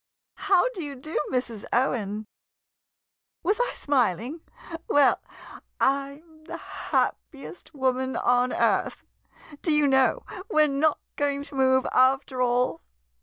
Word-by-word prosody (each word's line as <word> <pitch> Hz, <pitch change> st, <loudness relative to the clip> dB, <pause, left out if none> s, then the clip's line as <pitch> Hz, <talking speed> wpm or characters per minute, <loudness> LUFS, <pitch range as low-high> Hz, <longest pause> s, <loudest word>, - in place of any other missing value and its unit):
] -, -, -69 dB, 0.2 s
How 380 Hz, +1 st, +5 dB
do 400 Hz, -9 st, -6 dB
you 285 Hz, -2 st, -6 dB
do, 310 Hz, +5 st, -4 dB
Mrs. 240 Hz, -5 st, -3 dB
Owen! 215 Hz, -4 st, 0 dB, 1.2 s
Was 410 Hz, +6 st, +1 dB
I -, -, +1 dB
smiling? 255 Hz, -, 0 dB, 0.5 s
Well 290 Hz, -1 st, +4 dB, 0.3 s
— -, -, -19 dB
I 275 Hz, +2 st, 0 dB
'm 315 Hz, -2 st, -22 dB
the -, -, -6 dB
happiest 300 Hz, +2 st, -4 dB
woman 260 Hz, -1 st, 0 dB
on 245 Hz, +1 st, +2 dB
earth -, -, 0 dB, 0.3 s
— 295 Hz, -2 st, -18 dB
do 325 Hz, -, 0 dB
you 300 Hz, -1 st, +3 dB
know 270 Hz, -, +2 dB, 0.2 s
we're 310 Hz, 0 st, +4 dB
not 290 Hz, +2 st, +1 dB, 0.2 s
going 285 Hz, -1 st, -1 dB
to 285 Hz, -, -9 dB
move, 260 Hz, -1 st, +3 dB
after 260 Hz, 0 st, +2 dB
all? 245 Hz, -7 st, +1 dB
275 Hz, 135 wpm, -26 LUFS, 255-300 Hz, 1.2 s, How